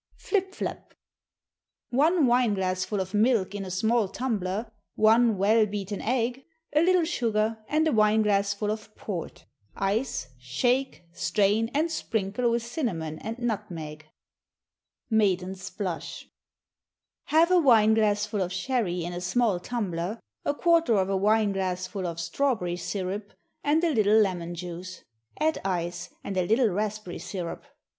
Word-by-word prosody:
Flip 385 -2 -1
Flap. - - -6 1.0
One 305 +5 +4
wine 240 -3 +3
glassful 185 +1 -1
of 190 +1 -4
milk 210 -3 +2
in 205 -1 -4
a 190 - -6
small 220 +4 +1
tumbler, 215 -1 -3 0.2
one 225 0 +4
well 215 +3 +4
beaten 200 -1 -4
egg, 250 +2 -1 0.3
a 300 - +4
little 360 0 +4
sugar, 225 -8 0
and 310 +1 +2
a - - +2
wine 215 -2 +4
glassful 200 0 +1
of 215 0 -7
port. 180 -6 -6 0.3
Ice, 195 - -1
shake, 245 - 0
strain, 205 +5 +1
and 320 +3 +1
sprinkle 220 -4 -1
with 235 0 0
cinnamon 175 - -3
and 225 +2 -5
nutmeg. 175 -10 -4 1.0
Maiden's 190 -3 +1
Blush. 185 -5 -5 1.0
Half 330 +3 +4
a 365 - +6
wine 225 -8 +5
glassful 210 -1 +1
of 180 -1 -1
sherry 190 -3 -1
in 175 - -4
a 175 - -5
small 200 +1 +1
tumbler, 195 -2 -3 0.2
a 285 - 0
quarter 330 -7 +3
of 190 -1 +1
a - - +1
wine 210 +2 +3
glassful 185 0 -2
of 170 -1 -5
strawberry 180 0 0
syrup, 195 +3 -4 0.3
and 305 +3 +2
a 335 -3 +2
little 215 -2 +4
lemon 175 -4 0
juice. 180 +1 -7 0.4
Add 315 +1 +1
ice, 175 -1 -2
and 195 - -4
a 180 - +2
little 225 +2 +3
raspberry 210 -1 -3
syrup. 175 -1 -5
210 Hz, 140 wpm, -27 LUFS, 185-240 Hz, 1.0 s, a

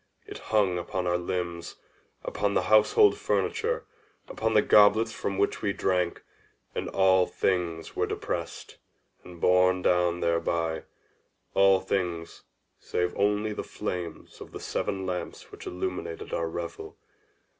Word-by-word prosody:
It - - -9
hung 100 -5 +2
upon 90 +1 -3
our 90 0 +1
limbs—upon 90 +3 -5
the - - +2
household 400 - +5
furniture—upon 430 - -2
the 105 - +6
goblets 105 +2 +5
from 100 -3 -3
which 100 - 0
we 100 -2 0
drank; 90 -3 0 0.5
and - - -3
all 95 -1 +4
things 85 -3 -1
were - - 0
depressed, - - -5 0.5
and 90 -1 -12
borne 90 +1 +3
down 90 -1 +2
thereby—all 85 +3 0
things 90 -4 -3 0.4
save 90 0 -2
only 105 +1 +1
the - - -4
flames 90 -2 -6
of - - -10
the - - -6
seven 95 -1 -3
lamps 90 -1 -5
which - - -10
illumined 90 -2 -5
our 85 0 -1
revel. 85 0 -6
90 Hz, 125 wpm, -27 LUFS, 85-105 Hz, 0.5 s, the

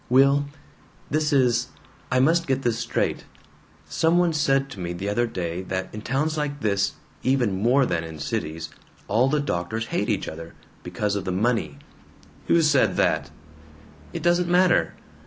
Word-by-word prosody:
"Will, 140 +3 +4 0.7
this 155 +1 +1
is 125 -3 +3 0.4
I 125 - +3
must 165 +5 +3
get 135 0 0
this 115 -1 0
straight. 120 - -1 0.6
Some 165 +1 +2
one 175 -2 +3
said 135 -2 +2
to 105 - -9
me 85 -1 -3
the 95 +3 -5
other 120 +4 +1
day 90 -4 -4
that 95 0 -4
in 105 - -6
towns 150 +7 -1
like 145 -1 -3
this, 100 -2 +1 0.3
even 120 -8 +1
more 130 +4 +4
than 85 -5 -1
in 80 -1 -8
cities, 80 +2 -4 0.4
all 120 +6 +3
the 150 +1 +1
doctors 110 -3 -2
hate - - 0
each - - -1
other, 80 +1 -8 0.3
because 105 -1 -2
of 100 - -2
the 95 - -3
money 115 +6 0 0.3
" - - -26
"Who 170 -1 +4
said 145 -3 +3
that?" 80 0 +1 0.8
"It - - -6
doesn't 175 0 +2
matter." 180 0 +3
120 Hz, 170 wpm, -24 LUFS, 95-145 Hz, 0.8 s, Will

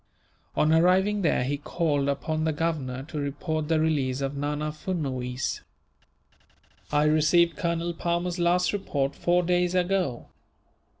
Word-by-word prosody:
On 155 +1 +3
arriving 190 +5 +3
there 160 -7 +2
he 140 +3 -1
called 145 -2 -1
upon 155 +3 -1
the 160 - +1
Governor, 145 -5 -2
to 150 +1 -6
report 150 +2 -3
the 160 0 +2
release 140 -5 0
of 135 +1 -2
Nana 150 +2 -2
Furnuwees. 135 -7 -3 1.3
"I 150 0 +3
received 155 +2 +3
Colonel 170 +1 -1
Palmer's 175 +1 -2
last 175 +2 +2
report, 145 -8 -1
four 175 +1 +2
days 180 +1 +1
ago. 180 -8 0
155 Hz, 130 wpm, -26 LUFS, 145-175 Hz, 1.3 s, On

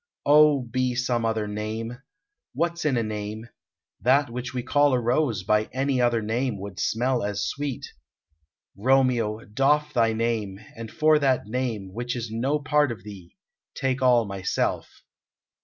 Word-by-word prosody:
O, 150 -2 +5
be 125 +1 -1
some 120 -2 0
other 110 -1 -1
name! 110 +3 -5 0.6
What's 170 0 -1
in 140 -5 +2
a 115 - +1
name? 110 +1 -5 0.5
That 130 +1 +3
which 125 0 -5
we 125 -1 -3
call 145 +2 +3
a 125 - +3
rose 120 -3 0
by 105 +2 +2
any 135 0 0
other 120 -2 +2
name 115 0 -1
would 100 -1 -8
smell 125 +2 0
as 100 -1 -2
sweet.... 140 -2 -4 0.9
Romeo, 120 -1 +1
doff 150 +7 +1
thy 115 -2 +2
name, 110 -4 -2 0.2
and 115 -1 -7
for 155 -1 +3
that 135 -5 +1
name 110 -5 -3
which 120 +3 -3
is 115 -2 -5
no 130 +6 0
part 150 -1 +1
of 105 -5 -8
thee, 95 -5 -12 0.4
take 135 0 -1
all 125 -3 +4
myself!" 100 -2 -3
120 Hz, 155 wpm, -25 LUFS, 110-135 Hz, 0.9 s, O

